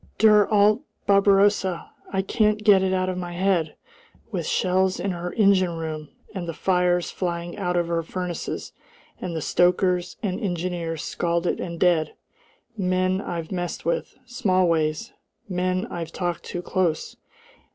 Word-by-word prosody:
"Der 210 -2 +6
alte 210 +2 +4 0.2
Barbarossa! 200 -2 +3 0.2
I 190 0 0
can't 215 +1 +1
get 205 -3 +6
it 190 0 +1
out 185 0 +1
of 185 -1 -2
my 175 -1 -5
head 175 -3 +1 0.6
with - - -3
shells 185 0 +1
in 195 - -1
her 175 0 -4
engine 190 -5 +3
room, 155 -2 -5 0.2
and 185 -4 -5
the 165 - -4
fires 180 -1 +1
flying 175 -1 -3
out 180 -3 -1
of 170 -1 +1
her 170 -1 0
furnaces, 175 0 -5 0.5
and 175 -3 -4
the 160 - -3
stokers 180 0 +2
and 190 -1 -1
engineers 175 -5 -3
scalded 170 0 -1
and 170 -2 -5
dead. 165 -4 +2 0.6
Men 185 -1 +1
I've 170 -4 -5
messed 175 -4 -4
with, 170 - -1
Smallways 185 - +1 0.3
men 185 +1 -1
I've 165 -2 -5
talked 175 -1 -3
to 175 - -5
close! 180 -5 -1
180 Hz, 145 wpm, -24 LUFS, 170-190 Hz, 0.6 s, Der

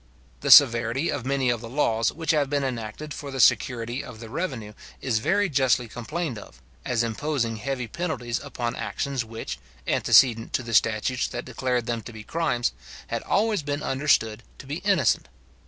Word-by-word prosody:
The - - -3
severity 115 +6 +6
of 130 -3 -4
many 135 -2 +2
of 120 -2 -2
the 115 - -8
laws 115 -4 +1
which 165 -1 -1
have 145 -3 +1
been 145 -1 0
enacted 130 +3 -4
for 145 - -7
the 135 -1 -5
security 120 0 +2
of 110 -3 -10
the 115 -1 -9
revenue 130 - -4 0.3
is 115 -4 0
very 205 - +2
justly 130 - +2
complained 125 +3 -4
of, 70 -9 -14 0.2
as 120 -1 0
imposing 115 -1 -1
heavy 125 +1 -3
penalties 125 -5 -3
upon 120 -4 -4
actions 140 -4 -2
which, 115 0 -6 0.3
antecedent 115 -3 +4
to 130 - 0
the 115 -1 -6
statutes 115 +4 +2
that - - -6
declared 125 -1 -1
them 115 -1 -2
to 115 - -9
be 110 -1 -9
crimes, 120 - 0 0.4
had 115 - -2
always 210 -2 +1
been 145 0 -3
understood 130 -5 +1 0.2
to - - -11
be 145 +3 -4
innocent. 180 - +2
125 Hz, 175 wpm, -25 LUFS, 115-145 Hz, 0.4 s, severity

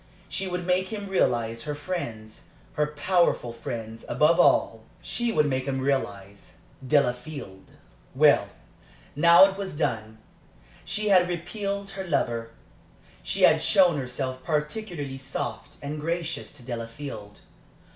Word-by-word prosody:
She 195 - -2
would 180 -1 -3
make 185 +1 +1
him 205 -1 -5
realize 115 -11 +1
her 150 - -3
friends, 120 -10 -6 0.3
her 150 0 +1
powerful 150 -4 +1
friends 115 -1 -6
above 150 +7 +3
all, 115 -9 +4 0.2
she 240 -1 -1
would 150 -8 +3
make 130 -2 -1
him 135 -1 -1
realize 100 -8 -3 0.3
Delafield. 125 -6 -1 0.5
Well, - - +5 0.7
now 170 +5 +8
it 195 0 -2
was 190 -6 -5
done. 110 -6 -2 0.7
She 210 0 -1
had 180 -2 +5
repelled 195 +3 -4
her 195 - -5
lover. 115 -10 -1 0.7
She - - -2
had - - +6
shown 180 -4 +4
herself 130 0 -4
particularly 150 -2 -3
soft 130 - -5
and 150 +1 -4
gracious 165 0 -3
to 140 - -13
Delafield. 115 -3 -7
145 Hz, 125 wpm, -26 LUFS, 120-180 Hz, 0.7 s, now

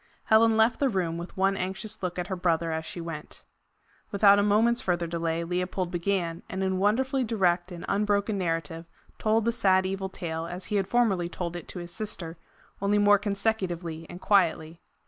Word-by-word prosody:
Helen 220 0 +4
left 225 +2 +3
the 275 - +2
room, 175 -6 -1
with 175 +2 -9
one 195 +1 +2
anxious 195 +4 -4
look 180 -1 -3
at 180 - -2
her 190 0 -3
brother 170 -2 0
as 160 0 -3
she - - -5
went. 165 -2 -7 0.6
Without 200 0 +5
a - - +4
moment's 225 +4 +3
further 175 -6 0
delay, 165 0 -2
Leopold 180 +1 -2
began, 175 -2 -1
and 190 +1 -3
in 190 -1 0
wonderfully 255 +7 +1
direct 185 -6 +1
and 175 -1 -7
unbroken 205 +1 +1
narrative, 165 -2 -2 0.3
told 220 0 +2
the 235 - +3
sad 190 -5 +3
evil 190 0 -3
tale 165 -3 -4
as 180 +2 -7
he 210 - -1
had 195 -1 0
formerly 200 -8 +1
told 175 -1 -4
it 175 - -7
to - - -8
his 175 -1 -7
sister, 185 -6 -5 0.5
only 200 +1 +2
more 205 0 +5
consecutively 185 -6 -2
and 175 +1 -9
quietly. 170 -4 +1
185 Hz, 185 wpm, -27 LUFS, 170-205 Hz, 0.6 s, Without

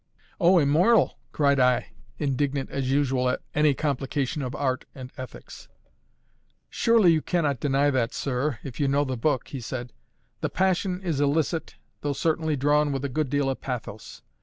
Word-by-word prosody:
"O, 180 0 +5
immoral!" 165 - +3
cried 140 -2 +2
I, 125 -1 +2 0.3
indignant 140 -1 -1
as 135 -2 -2
usual 135 -2 +1
at - - -2
any 150 -1 +3
complication 140 0 -2
of 125 -2 -4
art 130 -2 -1
and 130 -2 -9
ethics. 130 -3 -10 1.0
"Surely 225 -6 +4
you 160 -1 +2
cannot 150 -8 0
deny 145 +1 +2
that, 125 -4 0
sir 135 0 -2
if 130 -3 -8
you 145 - +2
know 140 +1 +2
the 130 -1 -2
book," 130 +1 0
he 135 - -6
said. 120 0 -6 0.5
"The - - -1
passion 185 0 0
is 160 -6 -1
illicit, 155 +3 0 0.3
although 145 -1 -1
certainly 160 +1 0
drawn 145 +2 +2
with 135 0 -2
a - - -2
good 150 +1 -1
deal 145 0 +1
of 135 - -2
pathos. 115 -4 -6
140 Hz, 165 wpm, -26 LUFS, 130-155 Hz, 1.0 s, O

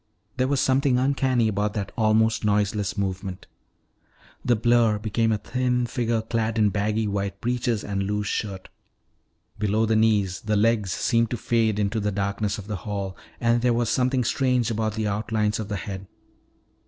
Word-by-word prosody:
There 130 0 +2
was 140 0 +1
something 130 -1 +2
uncanny 130 -3 +2
about 105 0 -1
that 100 -2 -3
almost 110 0 +2
noiseless 105 -1 0
movement. 95 -1 -3 1.0
The 120 - +3
blur 115 -1 +3
became 110 +1 0
a 110 - +2
thin 125 +2 0
figure 115 -2 -1
clad 115 0 -1
in 105 -2 +4
baggy 105 +2 0
white 100 -1 -2
breeches 120 -2 -1
and 100 -1 -2
loose 105 +1 -1
shirt. 100 -2 -3 0.9
Below 105 +2 +1
the 110 0 +1
knees 105 -4 +2
the 105 -1 0
legs 105 -3 +2
seemed 115 +5 +1
to 120 - -2
fade 110 -2 +1
into 105 +1 0
the 105 0 -1
darkness 100 +1 -1
of 105 - -8
the 105 -1 -4
hall 100 0 -4 0.2
and 120 0 +2
there 125 0 +3
was 120 -1 0
something 125 +1 +1
strange 125 -1 +1
about 110 -1 -1
the 110 -1 -1
outlines 105 +1 -1
of 110 - -4
the 105 - -3
head. 95 -1 -6
110 Hz, 170 wpm, -25 LUFS, 105-120 Hz, 1.0 s, in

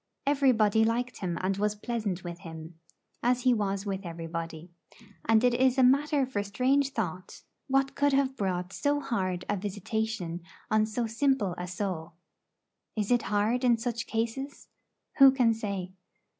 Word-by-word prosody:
Everybody 245 -7 +3
liked 245 +3 0
him 175 -3 -2
and 190 +1 0
was 210 +1 0
pleasant 210 -5 -3
with 175 -1 -6
him, 160 0 -10 0.4
as 250 +1 +2
he 255 - +5
was 200 -2 -1
with 195 -1 -3
everybody; 165 0 -6 0.5
and 225 +1 +4
it 245 -1 +4
is 260 +1 +3
a 260 - +5
matter 280 +2 +4
for 250 -6 -2
strange 255 +7 +1
thought, 185 -7 -5 0.2
what 270 0 +2
could 285 0 +2
have 270 -1 +2
brought 185 -3 -2
so 290 0 +1
hard 185 -9 -2
a 205 - 0
visitation 205 -2 -3 0.3
on 215 0 +3
so 230 +2 -2
simple 225 -4 +1
a 180 - -5
soul. 175 -3 -4 0.8
Is 210 +1 -1
it 245 -1 +4
hard 215 +5 +1
in 240 -2 +4
such 235 0 -3
cases? 235 +5 -3 0.5
Who 275 0 +10
can 245 -4 +3
say? 200 -4 -4
220 Hz, 155 wpm, -29 LUFS, 185-250 Hz, 0.8 s, Who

